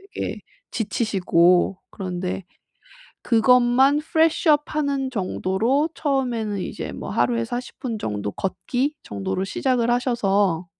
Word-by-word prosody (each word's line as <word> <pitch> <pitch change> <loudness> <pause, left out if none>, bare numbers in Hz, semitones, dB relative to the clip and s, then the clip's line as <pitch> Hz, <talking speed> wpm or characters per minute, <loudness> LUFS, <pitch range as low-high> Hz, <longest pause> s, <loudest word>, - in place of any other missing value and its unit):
되게 - - -3 0.3
지치시고 190 -5 +2
그런데 185 -1 -4 0.8
그것만 250 +4 +4
프레쉬 320 +2 +1
업 295 -1 +5
하는 280 -3 0
정도로 225 - 0
처음에는 245 -8 -1
이제 185 - -5
뭐 - - -7
하루에 120 -1 +1
40 245 - -6
분 240 -5 -3
정도 105 - -3
걷기 250 - -2
정도로 100 - -3
시작을 240 +3 0
하셔서 205 -8 +1
230 Hz, 250 characters per minute, -23 LUFS, 185-265 Hz, 0.8 s, 업